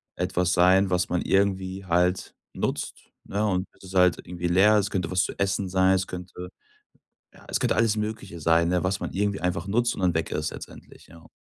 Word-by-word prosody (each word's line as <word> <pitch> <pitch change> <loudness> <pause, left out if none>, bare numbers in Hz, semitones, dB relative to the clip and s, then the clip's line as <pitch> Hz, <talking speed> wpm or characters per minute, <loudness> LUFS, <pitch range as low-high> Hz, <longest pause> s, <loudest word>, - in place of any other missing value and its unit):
etwas 90 0 0
sein, 95 +2 +4
was 90 0 0
man 90 - 0
irgendwie 95 -1 0
halt 90 +1 0 0.2
nutzt, - - -4
ne, 105 +2 -1
und 95 -2 -1
bis - - -23
es 95 0 -11
halt 90 -1 +4
irgendwie 90 0 -4
leer 100 +5 +5
ist 100 0 -1
könnte 90 -3 -2
was 90 0 +2
zu - - -5
essen 100 -1 -1
sein, 95 +1 +3
es 95 0 0
könnte 90 0 -8 0.8
ja, - - -18
es - - 0
könnte - - +1
alles 115 -1 +2
Mögliche 105 -4 -5
sein, 85 +2 +3
ne, 90 0 0
was 95 +1 -1
man - - -4
irgendwie 100 0 -1
einfach 90 0 -2
nutzt 120 +4 +1
und - - -7
dann 90 -2 +2
weg 80 - -1
ist 75 0 -2
letztendlich, - - -12
ja. 85 -1 -16
95 Hz, 210 wpm, -25 LUFS, 90-100 Hz, 0.8 s, leer